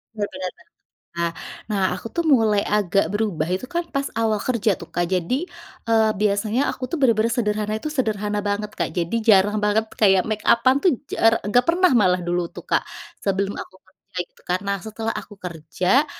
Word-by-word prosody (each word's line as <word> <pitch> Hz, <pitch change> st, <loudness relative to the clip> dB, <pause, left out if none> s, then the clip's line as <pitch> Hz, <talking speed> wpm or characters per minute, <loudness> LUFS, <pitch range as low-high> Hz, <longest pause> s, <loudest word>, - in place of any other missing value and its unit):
Benar 205 Hz, -1 st, -1 dB
benar. 185 Hz, -1 st, -4 dB, 0.7 s
Nah 170 Hz, 0 st, 0 dB, 0.4 s
nah 205 Hz, -3 st, -1 dB
aku 185 Hz, -, -8 dB
tuh 340 Hz, -, +1 dB
mulai 225 Hz, -10 st, +3 dB
agak 200 Hz, -4 st, +1 dB
berubah 200 Hz, -7 st, -1 dB
itu 185 Hz, +7 st, -2 dB
kan 345 Hz, +5 st, -2 dB
pas 275 Hz, 0 st, -1 dB
awal 220 Hz, -1 st, +1 dB
kerja 215 Hz, -4 st, 0 dB
tuh 170 Hz, -, -9 dB
Kak. 175 Hz, 0 st, 0 dB
Jadi, 220 Hz, -, -1 dB, 0.4 s
eee, 220 Hz, -1 st, +4 dB
biasanya 210 Hz, +5 st, +1 dB
aku 255 Hz, -, -5 dB
tuh 340 Hz, -, -1 dB
benar-benar 230 Hz, -2 st, +3 dB
sederhana 210 Hz, -2 st, -1 dB
itu 305 Hz, -, -4 dB
sederhana 210 Hz, -7 st, -1 dB
banget, 205 Hz, +1 st, -2 dB
Kak. 170 Hz, -1 st, 0 dB
Jadi 175 Hz, +4 st, -1 dB
jarang 205 Hz, 0 st, +5 dB
banget 220 Hz, +1 st, +1 dB
kayak 195 Hz, -3 st, +5 dB
makeup-an 230 Hz, +4 st, +3 dB
tuh 370 Hz, -, +5 dB, 0.2 s
jara 225 Hz, 0 st, +3 dB
nggak 245 Hz, +4 st, +2 dB
pernah 355 Hz, +1 st, +4 dB
malah 185 Hz, -4 st, +3 dB
dulu 175 Hz, 0 st, -1 dB
tuh -, -, -8 dB
Kak, -, -, +2 dB, 0.4 s
sebelum 195 Hz, 0 st, 0 dB
aku -, -, -8 dB
kerja 185 Hz, 0 st, -24 dB
gitu. -, -, -26 dB
Karena 185 Hz, +3 st, -1 dB
setelah 220 Hz, +2 st, -4 dB
aku 205 Hz, -, -8 dB
kerja 180 Hz, -, 0 dB
210 Hz, 180 wpm, -22 LUFS, 190-230 Hz, 0.7 s, jarang